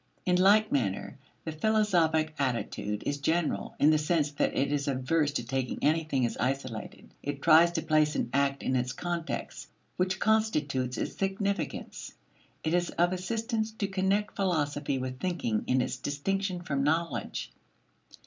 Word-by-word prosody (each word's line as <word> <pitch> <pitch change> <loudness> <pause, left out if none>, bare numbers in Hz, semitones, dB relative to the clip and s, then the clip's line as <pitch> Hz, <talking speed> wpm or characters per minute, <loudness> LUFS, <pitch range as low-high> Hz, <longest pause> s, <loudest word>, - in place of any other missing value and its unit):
In 180 - +3
like 210 +4 +5
manner 105 -9 -1 0.3
the 160 - -2
philosophic 165 -4 +2
attitude 115 -5 -2
is 145 0 -1
general 160 +3 0
in 150 - +6
the 155 - +3
sense 150 -1 +1
that 145 - 0
it 140 +1 +1
is 145 0 -1
averse 140 +3 +1
to 120 -4 -2
taking 130 +1 -2
anything 155 -4 +2
as 120 - -2
isolated; 130 -3 -4
it 145 -1 -4
tries 165 +2 +6
to 160 - -1
place 155 -1 +2
an - - 0
act 140 0 +1
in 130 - 0
its 125 0 0
context 175 -1 -4 0.3
which 185 +1 0
constitutes 150 - +1
its - - -3
significance. 200 +1 -3 0.5
It 160 - 0
is 175 0 +2
of 175 +1 +1
assistance 220 +4 -2
to 215 -2 -2
connect 195 +2 0
philosophy 145 -7 0
with 130 0 -4
thinking 165 -12 -1
in 130 0 +3
its 125 - -2
distinction 180 +7 -2
from 140 -5 -1
knowledge. 155 -3 -1
155 Hz, 155 wpm, -29 LUFS, 135-185 Hz, 0.5 s, in